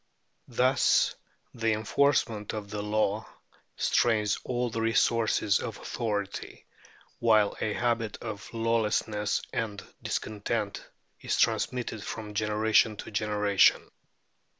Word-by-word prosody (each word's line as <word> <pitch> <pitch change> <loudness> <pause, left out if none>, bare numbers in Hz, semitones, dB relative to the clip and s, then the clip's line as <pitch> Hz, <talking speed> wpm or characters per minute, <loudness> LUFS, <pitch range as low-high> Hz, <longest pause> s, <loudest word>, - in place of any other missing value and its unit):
Thus 130 +2 +3 0.4
the 115 -2 +1
enforcement 110 -1 +1
of 105 -2 -6
the 105 -1 -3
law 105 0 0 0.5
strains 105 -3 +2
all 125 -1 -1
the 115 0 -2
resources 115 -2 +2
of 115 -3 -5
authority, 105 -4 -4 0.5
while 110 -3 +4
a 105 - 0
habit 115 -2 -1
of 110 -3 -7
lawlessness 110 -2 0
and 105 -3 -3 0.2
discontent 105 0 -3 0.3
is - - -1
transmitted 120 -4 0
from 105 -2 -6
generation 110 +1 +2
to - - -8
generation. 105 -1 +3
110 Hz, 105 wpm, -28 LUFS, 105-115 Hz, 0.5 s, while